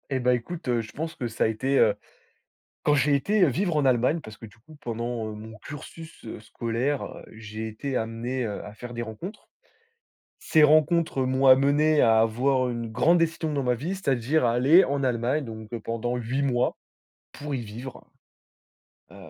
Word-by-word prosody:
Eh 135 -2 -1
bah, 125 0 +2
écoute, 130 +7 -4
heu, 120 -2 +1
je 110 - -10
pense 160 +2 -5
que 125 -6 -3
ça 110 - -1
a - - +3
été, 130 +5 0
heu, - - +5 0.9
quand 150 - +3
j'ai 140 +1 +3
été, 200 +8 +2
heu, - - +6
vivre 170 +5 0
en 145 - +2
Allemagne, 130 +5 +2
parce 110 -4 -11
que - - -10
du 110 0 -17
coup 155 +7 -16
pendant, 115 -2 -3
heu, - - -6
mon 110 +1 -10
cursus, 160 +3 -10
heu, 110 - -7
scolaire 120 +5 -2
heu, - - -9
j'ai 110 0 -7
été 130 +5 -5
amené, 115 +3 -3
heu, 105 -2 -5
à 105 - -9
faire 120 +3 -9
des 120 - -4
rencontres. 165 - -8 0.9
Ces 155 - +3
rencontres 155 -1 +3
m'ont 130 +1 +1
amené 145 +3 +5
à 115 -1 +5
avoir 125 +3 +2
une 115 -2 -4
grande 170 +10 +3
décision 165 -1 0
dans 140 -2 -1
ma 125 -1 +2
vie, 160 +11 -4
c'est-à-dire 140 -5 +1
à 115 - +3
aller 140 +10 +6
en 140 0 -1
Allemagne, 130 +4 0
donc, 110 -2 -9
heu, 115 - -3
pendant 115 +2 -3
8 125 +4 -2
mois 125 -3 0 0.6
pour 145 0 -5
y - - -1
vivre. 115 +4 -9 1.0
Heu, - - -14
130 Hz, 195 wpm, -26 LUFS, 115-150 Hz, 1.0 s, heu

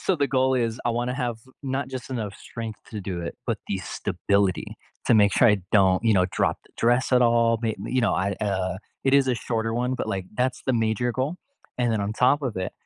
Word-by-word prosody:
so 190 - +1
the 140 -3 +1
goal 130 0 +2
is, 115 -2 -1
I 120 - +2
wanna 120 +2 -1
have 120 -4 -2 0.2
not 135 0 -2
just 130 0 -7
enough 105 -6 -3
strength 115 -2 -7
to 105 - -5
do 95 -2 -4
it, 85 - -5
but - - -1
the - - -1
stability 100 -2 -1 0.3
to - - +5
make 100 -2 +5
sure 120 - +5
I 105 - +4
don't, 95 -3 +5
you 110 - +4
know, 90 -1 +4
drop - - 0
the - - -24
dress 120 +3 +2
at 125 - +5
all, 115 -1 +3
may 110 -2 0
you 130 - +1
know, 120 - +2
I 100 +1 0
uh, 95 -2 -1 0.3
it 135 - +2
is 140 -1 +5
a 125 - +2
shorter 115 -1 -2
one, 125 +2 0
but, - - -3
like, 95 -2 -3
that's 125 0 0
the 130 - +2
major 115 +1 +1
goal. 135 +8 -2 0.4
And 120 -2 +2
then 110 - 0
on 100 +1 -2
top 125 +6 +3
of 120 -7 -3
it, 95 0 -3
115 Hz, 240 wpm, -25 LUFS, 100-125 Hz, 0.4 s, to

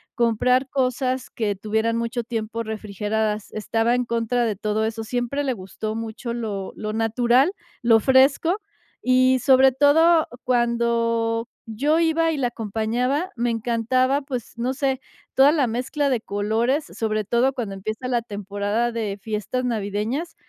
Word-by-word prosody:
comprar 250 +2 +2
cosas 255 -1 -1
que 210 -3 -2
tuvieran 220 +3 -1
mucho 235 +1 -2
tiempo 230 0 -4
refrigeradas. 215 0 -3
Estaba 225 +2 0
en 250 0 +1
contra 235 +1 0
de 215 - -1
todo 215 +2 -1
eso, 225 0 -2
siempre 245 +5 -2
le 265 -2 0
gustó 215 +2 -5
mucho 225 +1 -5
lo 210 -5 -4
lo 215 0 -4
natural, 240 - +2 0.3
lo 230 -1 +6
fresco, 275 - +3 0.5
y 255 0 +4
sobre 265 0 +6
todo 320 +4 +5 0.2
cuando 235 -1 +1 0.2
yo 280 +9 +1
iba 330 0 +2
y 305 - -2
la 255 - +1
acompañaba, 240 - -1
me 240 +1 0
encantaba, 240 +4 +1
pues, 255 -5 -6
no 250 +3 -1
sé, 270 -1 -1 0.3
toda 275 +2 +6
la 290 -5 +2
mezcla 265 +5 -1
de 250 - +1
colores, 225 +8 0
sobre 215 -4 -2
todo 240 +6 +1
cuando 230 -7 -4
empieza 215 +6 -5
la 240 -2 +1
temporada 205 +2 -2
de 215 -4 -3
fiestas 220 +4 -3
navideñas. 225 - -2
235 Hz, 145 wpm, -23 LUFS, 220-260 Hz, 0.5 s, lo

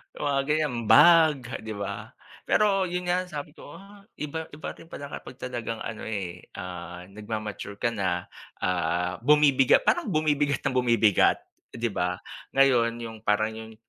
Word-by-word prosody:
Mga 140 -1 0
ganyan, 150 -3 +1
bag 150 -5 +6
'di 110 -1 -6
ba 100 -1 -6 0.3
pero 195 -3 +3
yun 180 +1 -3
nga 180 +1 0
sabi 150 -3 -6
ko, 145 -2 -13
ah, 200 +1 -15
iba 160 +2 -5
iba 155 - -7
rin 165 - -14
pala 145 -3 -8
kapag - - -8
talagang 120 -3 -5
ano 110 -1 -6
eh, 95 -5 -5
ah, 90 -2 -7
nag-ma-mature 105 -1 -6
ka 115 +3 -1
na, 95 -5 -1 0.4
ah, 90 0 0
bumibiga 140 0 +5
parang 345 -9 +1
bumibigat 150 -4 +1
nang 135 - 0
bumibigat, 115 -5 +3 0.3
'di 115 -1 -1
ba? 90 -1 -1 0.4
Ngayon 120 -4 +4
yung 110 -1 -7
parang 110 0 +1
'yong 110 0 -10
120 Hz, 150 wpm, -26 LUFS, 105-150 Hz, 0.4 s, bag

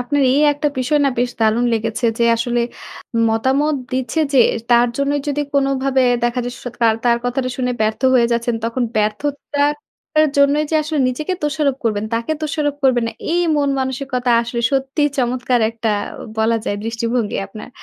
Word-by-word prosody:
আপনার 280 +3 0
এই 285 - +3
একটা 290 +1 -1
বিষয় 295 +4 +1
না - - +4
বেশ 245 0 +1
দারুণ 220 +2 +2
লেগেছে 225 +2 -1
যে, 235 - +3
আসলে 240 +1 0 0.7
মতামত 265 +7 +1 0.2
দিচ্ছে 260 +5 -1
যে, 270 - +4 0.3
তার 240 0 +5
জন্যই 280 +1 0
যদি 290 +1 -1
কোন 275 -1 +3 0.2
ভাবে 270 -1 +2 0.2
দেখা 240 +1 0
যায় 245 - -4
স - - -12
কার 225 -1 +4
তার 235 -1 +4
কথাটা 255 +1 -1
শুনে 250 -1 -1
ব্যর্থ 215 0 0
হয়ে 240 -2 +5
যাচ্ছেন, 235 0 0
তখন 230 +2 -1
ব্যর্থতা 285 +7 -1 0.6
এর 310 - +4
জন্যই 285 +2 +4
যে - - -1
আসলে 305 0 -3
নিজেকে 305 +8 -3
দোষারোপ 290 -2 0
করবেন, 215 -2 0
তাকে 230 +7 -1
দোষারোপ 295 -1 -1
করবেন 245 -3 +3
না - - -6 0.2
এই 350 - +2 0.2
মন 285 -1 +1
মানসিকতা 260 -1 -2
আসলে 235 0 -4
সত্যিই 275 +2 +1
চমৎকার 250 0 +1
একটা 225 -1 -2 0.5
বলা 225 +1 +2
যায় 205 - -2
দৃষ্টিভঙ্গি 230 0 -1
আপনার, 215 +4 -10
250 Hz, 175 wpm, -19 LUFS, 235-285 Hz, 0.7 s, তার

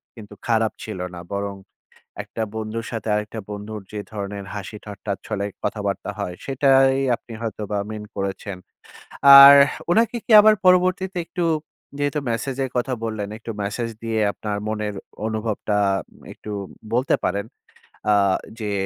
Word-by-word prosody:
কিন্তু 105 -3 -11
খারাপ 110 -1 +2
ছিল 105 -4 -6
না। 90 - -7
বরং 100 0 -3 0.7
একটা - - -6
বন্ধুর 110 +1 -4
সাথে 115 -2 -5
আরেকটা 105 +1 -3
বন্ধুর 105 +1 -6
যে 105 - -5
ধরনের 100 -1 -5
হাসি-ঠাট্টার 105 0 -6
ছলে 100 0 -2 0.2
কথাবার্তা 100 -1 -2
হয়, 90 -3 -3
সেটাই 135 0 +4 0.2
আপনি 115 - -13
হয়তো 110 -2 -4
বা 105 - 0
মিন 105 -1 -6
করেছেন। 100 0 -4 0.8
আর 140 +1 +12 0.4
উনাকে 230 +5 +3
কি - - 0
আবার 215 +1 +6
পরবর্তীতে 185 +1 +3
একটু 175 -1 -3 0.5
যেহেতু 145 +1 0
মেসেজের 130 +3 -2
কথা 125 +2 0
বললেন 110 -3 -3
একটু 115 - -8
মেসেজ 115 +3 -3
দিয়ে 115 -1 -1
আপনার 105 -1 -4
মনের 105 -1 -2 0.3
অনুভবটা 110 -1 -1 0.3
উম - - -21
একটু 105 - -10 0.4
বলতে 125 +3 +2
পারেন। 100 +3 -1 0.7
আ - - +6 0.5
যে 105 -2 -3
110 Hz, 140 wpm, -22 LUFS, 105-130 Hz, 0.8 s, আর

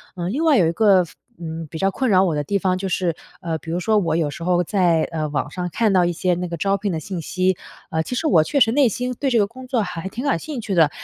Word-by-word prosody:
嗯， 180 +1 -3
另 295 +7 -1
外 310 -4 +5
有 175 -6 +4
一 - - +1
个 195 -1 +4
非 - - -16 0.2
嗯， 165 -1 -6
比 160 - -7
较 195 +4 +1
困 260 +6 -1
扰 190 -2 +5
我 180 -4 +1
的 150 -1 -2
地 200 - 0
方 185 -1 0
就 190 +1 -3
是， 180 -2 0 0.3
呃， 165 -3 -2
比 160 - -11
如 170 - -1
说 220 +2 +2
我 165 -6 +1
有 160 -3 +1
时 145 - -9
候 175 +1 +2
在， 175 -3 +2
呃， 155 -2 -2
网 145 0 -3
上 180 +1 -4
看 220 +4 +1
到 185 -2 +4
一 175 - 0
些 180 +2 0
那 180 +1 -3
个 170 - -4
招 195 +4 0
聘 200 -1 -2
的 - - -1
信 180 +2 -5
息， 185 +2 0 0.3
呃， 160 - +1
其 250 - -4
实 320 - -2
我 175 - +5
确 280 - -1
实 225 -2 +5
内 275 +1 +4
心 250 +3 -2
对 280 - +1
这 240 - +2
个 210 - +4
工 255 +5 -11
作 250 -3 +1
还 180 -2 -5
挺 230 +6 -6
感 170 -12 +1
兴 275 - -5
趣 210 -2 -3
的， 160 -3 +5
185 Hz, 325 characters per minute, -21 LUFS, 165-215 Hz, 0.3 s, 外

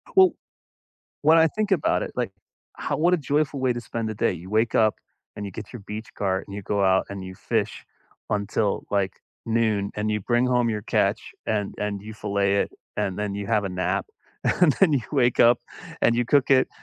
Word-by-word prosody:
Well 375 -1 +7 0.9
when 160 +2 +6
I 160 - +6
think 210 +5 -2
about 175 - +2
it, - - -5
like, - - -1 0.5
how - - -2
what 175 +3 +4
a - - +4
joyful 145 -2 0
way 130 -1 +2
to 120 - -4
spend 115 -1 -4
the 110 - -4
day. 100 - +1
You 90 +1 -9
wake 110 +2 +1
up, 110 -1 +4 0.4
and 105 - -5
you - - -6
get - - -9
your 120 - -7
beach 110 +1 -6
cart 95 -1 -1
and 100 - -9
you 100 - -5
go 100 +1 0
out 95 0 +3
and 100 -1 -6
you 95 0 -8
fish - - -2 0.5
until, 105 0 0
like, 100 -2 +1 0.3
noon, 110 -3 +1
and 105 +1 -1
you 105 0 0
bring 120 +4 +2
home 125 -1 +2
your 105 -1 -3
catch - - +1 0.3
and 105 -2 -1
and 105 -1 -2
you 110 +1 -8
fillet 100 -1 0
it - - -6 0.3
and 95 -1 -1
then 105 -1 -2
you 100 0 -4
have 105 -1 +1
a - - -1
nap, 90 0 -1 0.5
and 170 -5 +6
then 190 -6 +6
you 140 - +3
wake 125 -4 +3
up, 120 0 +6 0.4
and 115 - +4
you 120 +1 +1
cook 140 +2 +3
it, 130 -1 +5
110 Hz, 215 wpm, -25 LUFS, 100-125 Hz, 0.9 s, Well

